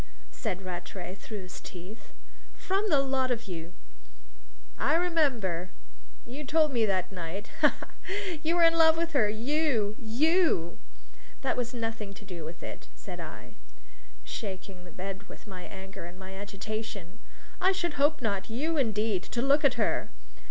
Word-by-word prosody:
said 195 Hz, -5 st, -3 dB
Rattray, 180 Hz, 0 st, -5 dB
through 205 Hz, +1 st, -6 dB
his 180 Hz, -, -8 dB
teeth. 185 Hz, +5 st, -10 dB, 0.4 s
"From 395 Hz, +3 st, +1 dB
the 295 Hz, -, +6 dB
lot 265 Hz, -1 st, +1 dB
of 235 Hz, -2 st, 0 dB
you." 170 Hz, -2 st, -6 dB, 1.1 s
"I -, -, +4 dB
remember! 260 Hz, -, +2 dB, 0.6 s
You 265 Hz, +5 st, -6 dB
told 305 Hz, 0 st, +3 dB
me 230 Hz, -3 st, +4 dB
that 190 Hz, -2 st, +1 dB
night. 185 Hz, +2 st, -5 dB
Ha, 300 Hz, -, +9 dB
ha, -, -, -7 dB, 0.2 s
ha! 390 Hz, -3 st, -2 dB
You 325 Hz, +2 st, +2 dB
were 345 Hz, -, +5 dB
in 330 Hz, 0 st, +8 dB
love 320 Hz, 0 st, +7 dB
with 335 Hz, 0 st, 0 dB
her 245 Hz, -9 st, +4 dB
you 230 Hz, -2 st, +1 dB
you!" 255 Hz, -, +3 dB, 0.6 s
"That 265 Hz, -, +2 dB
has 240 Hz, -1 st, -1 dB
nothing 225 Hz, -3 st, -3 dB
to 205 Hz, -, -11 dB
do 180 Hz, -4 st, -6 dB
with 165 Hz, +2 st, -7 dB
it," -, -, -7 dB
said -, -, -8 dB
I, -, -, -7 dB, 0.7 s
shaking 190 Hz, -2 st, -5 dB
the 175 Hz, -, -11 dB
bed 195 Hz, +3 st, -6 dB
with -, -, -11 dB
my 185 Hz, -4 st, -7 dB
anger 190 Hz, -2 st, -8 dB
and 175 Hz, +1 st, -9 dB
my 190 Hz, 0 st, -8 dB
agitation. 200 Hz, -1 st, -5 dB, 0.4 s
"I 375 Hz, +1 st, +6 dB
should 345 Hz, -4 st, 0 dB
hope 300 Hz, +1 st, +4 dB
not! 200 Hz, -2 st, 0 dB
You, 305 Hz, +8 st, 0 dB
indeed, 215 Hz, -6 st, +2 dB
to 235 Hz, -, 0 dB
look 285 Hz, +3 st, +5 dB
at 275 Hz, -3 st, +5 dB
her!" -, -, +1 dB
220 Hz, 165 wpm, -30 LUFS, 190-295 Hz, 1.1 s, Ha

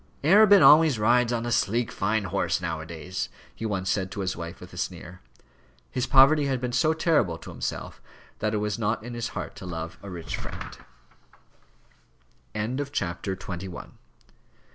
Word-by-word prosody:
"Arabin 200 Hz, +5 st, +7 dB
always 155 Hz, -4 st, +7 dB
rides 120 Hz, +2 st, +3 dB
on 120 Hz, -1 st, -1 dB
a 120 Hz, -, -2 dB
sleek, 115 Hz, +2 st, +1 dB
fine 105 Hz, +2 st, 0 dB
horse, 95 Hz, -3 st, 0 dB
now 80 Hz, -3 st, -3 dB
a 80 Hz, -, -8 dB
days," 85 Hz, +3 st, -5 dB, 0.2 s
he 110 Hz, -, -4 dB
once 95 Hz, -3 st, -2 dB
said 95 Hz, -1 st, 0 dB
to 100 Hz, -, -5 dB
his 95 Hz, -1 st, -2 dB
wife 85 Hz, 0 st, -7 dB
with 90 Hz, 0 st, -12 dB
a -, -, -10 dB
sneer. 90 Hz, 0 st, -5 dB, 0.7 s
His 125 Hz, -1 st, -1 dB
poverty 140 Hz, +2 st, +6 dB
had 135 Hz, -2 st, 0 dB
been 125 Hz, 0 st, -3 dB
so 155 Hz, +6 st, +3 dB
terrible 160 Hz, -, +1 dB
to -, -, -10 dB
himself -, -, -5 dB, 0.4 s
that 110 Hz, 0 st, 0 dB
it 105 Hz, -, -1 dB
was 105 Hz, +1 st, -2 dB
not 110 Hz, 0 st, -1 dB
in 120 Hz, +1 st, -7 dB
his 120 Hz, -1 st, -3 dB
heart -, -, -5 dB
to -, -, -8 dB
love 80 Hz, -1 st, -6 dB
a 100 Hz, -, -9 dB
rich 85 Hz, -3 st, -5 dB
friend. -, -, -7 dB
105 Hz, 165 wpm, -26 LUFS, 90-125 Hz, 0.7 s, Arabin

